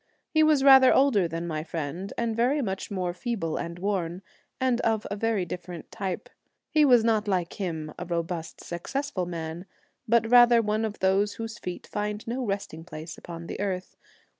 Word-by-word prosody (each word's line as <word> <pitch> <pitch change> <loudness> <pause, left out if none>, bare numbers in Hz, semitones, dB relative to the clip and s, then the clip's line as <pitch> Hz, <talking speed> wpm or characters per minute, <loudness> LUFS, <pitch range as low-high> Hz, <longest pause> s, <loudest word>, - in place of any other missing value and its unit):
He 315 - +4
was 305 -3 +4
rather 265 -2 +8
older 245 -10 +4
than 165 +1 -4
my 155 -2 -3
friend, 165 +4 -5
and 230 -1 -1
very 250 +6 +2
much 195 -7 -3
more 185 -3 -2
feeble 195 -6 -3
and 170 0 -5
worn, 185 -2 -2 0.4
and 255 -2 +1
of 220 -2 +1
a - - -1
very 215 -3 0
different 175 0 -7
type. 190 -3 -4 0.4
He 305 - +5
was 245 -5 +6
not 220 -2 +2
like 180 -4 0
him, 160 -5 -3
a - - -4
robust, 170 -1 -3
successful 185 - -3
man, 165 +1 -5 0.4
but 230 0 +3
rather 240 -1 +8
one 215 0 0
of 215 -1 -4
those 195 +2 +2
whose 225 0 -6
feet 180 -1 -6
find 210 0 -3
no 250 +3 -2
resting 195 -7 -4
place 165 -1 -8
upon 170 -1 -9
the - - -6
earth. 190 -2 -3
200 Hz, 180 wpm, -27 LUFS, 170-230 Hz, 0.4 s, rather